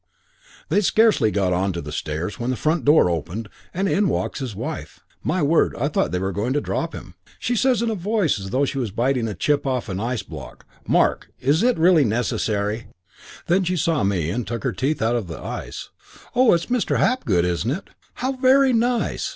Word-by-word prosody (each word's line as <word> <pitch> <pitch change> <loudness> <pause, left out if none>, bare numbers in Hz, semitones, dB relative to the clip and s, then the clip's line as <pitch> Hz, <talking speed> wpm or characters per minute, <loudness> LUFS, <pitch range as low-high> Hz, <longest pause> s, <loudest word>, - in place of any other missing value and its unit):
"They'd 200 +7 +2
scarcely 215 - +4
got 95 -3 +1
on 95 +2 0
to 85 - -4
the - - -7
stairs 80 +6 -4
when 120 +1 -2
the 130 - 0
front 155 +5 0
door 150 - +5
opened 90 +6 -3 0.2
and 195 +3 -1
in 195 0 +2
walks - - -2
his 125 -6 -5
wife. - - -6 0.2
My 165 +1 0
word, 160 +3 +3
I - - 0
thought 75 - 0
they 90 - 0
were 95 +1 -1
going 105 +7 -1
to 145 - +2
drop - - -3
him. - - -10 0.2
She 245 +2 -1
says 245 -1 +2
in 230 - 0
a - - 0
voice 200 - 0
as 95 0 -6
though 135 +7 +1
she 135 - -3
was 120 -4 -1
biting 120 +3 0
a 105 - -4
chip 145 - 0
off 130 -4 -1
an 95 0 -3
ice 115 -1 -2
block, 75 -8 -10 0.2
'Mark, - - +2
is 145 +6 +2
it 245 +1 +3
really 165 -1 +5
necessary 110 -2 -1 0.3
' - - -18
Then 185 +3 +3
she 180 +1 -1
saw 160 -5 +1
me 90 -5 0
and 120 +2 -3
took 120 +2 -4
her 130 - 0
teeth 135 +7 -1
out 115 +2 +2
of 115 -6 -2
the 80 - -7
ice. - - -6 0.5
'Oh, 255 -1 +5
it's 170 - -2
Mr. 245 -2 0
Hapgood, 105 - +2
isn't 90 +5 -1
it? 185 +9 -4 0.2
How 260 +2 -1
very 265 0 +4
nice! 240 +1 0
130 Hz, 215 wpm, -22 LUFS, -, 0.5 s, door